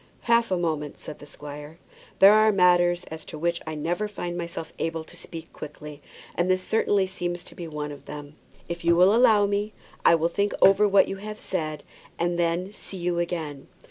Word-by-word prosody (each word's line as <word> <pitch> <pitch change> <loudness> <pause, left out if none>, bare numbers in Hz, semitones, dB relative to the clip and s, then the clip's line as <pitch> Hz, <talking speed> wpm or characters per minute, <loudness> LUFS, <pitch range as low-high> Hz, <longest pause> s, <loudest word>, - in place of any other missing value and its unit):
"Half 235 0 +3
a 185 - +1
moment," 155 -4 -2
said 155 - -9
the 145 - -12
squire. 145 +2 -9 0.4
"There 195 +2 +8
are 215 0 +5
matters 175 -2 +4
as 160 0 -7
to - - -8
which 170 +2 -1
I 160 - -4
never 175 +7 -2
find 175 -4 -5
myself 170 -2 -5
able 165 0 -2
to - - -15
speak 165 -1 -10
quickly, 150 0 -9 0.3
and 175 +1 0
this 185 0 +2
certainly 205 -3 +2
seems 175 -1 -4
to - - -12
be 170 - -7
one 150 -1 -5
of 145 - -11
them. 145 0 -9 0.3
If 170 0 -5
you 170 0 +4
will 180 +4 +6
allow 225 -3 +5
me 205 +1 -1 0.3
I - - +6
will 165 0 +1
think 200 +4 -1
over 195 +2 +6
what 200 -1 +5
you 195 - -4
have 210 +2 -7
said, 155 -7 -4 0.3
and 175 0 -1
then 175 +3 0
see 195 - -10
you 175 -1 -1
again." 160 -5 -4
175 Hz, 205 wpm, -25 LUFS, 160-195 Hz, 0.4 s, There